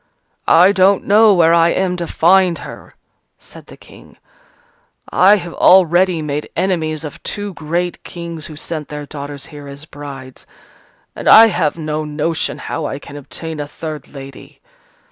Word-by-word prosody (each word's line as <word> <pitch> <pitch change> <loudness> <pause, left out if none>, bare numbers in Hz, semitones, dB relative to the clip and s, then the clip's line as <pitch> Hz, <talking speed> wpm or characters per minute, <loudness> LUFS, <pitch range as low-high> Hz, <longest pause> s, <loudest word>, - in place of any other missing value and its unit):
"I 180 +4 +6
don't 195 0 +3
know 215 +2 +5
where 165 -1 +4
I 170 0 +4
am 185 0 0
to 170 -1 -4
find 180 0 +3
her," - - -12 0.4
said - - -15
the - - -14
King, - - -17 0.9
"I 195 +3 +5
have 175 -4 -6
already 180 -2 +4
made 150 0 -4
enemies 165 -4 -1
of 150 - -9
two 205 -1 -5
great 170 +2 -3
Kings 170 -2 -7
who 155 - -10
sent 155 -1 -6
their 150 0 -7
daughters 145 -1 -8
here 145 -1 -10
as 140 +2 -9
brides: 140 -4 -11 0.7
and - - -1
I 225 +1 +9
have 155 -6 -1
no 155 -1 -3
notion 155 +2 -2
how 160 - -5
I 135 - -5
can 145 0 -12
obtain 155 +2 -7
a 145 - -4
third 155 -1 -7
lady. 135 -1 -12
160 Hz, 160 wpm, -17 LUFS, 150-180 Hz, 0.9 s, I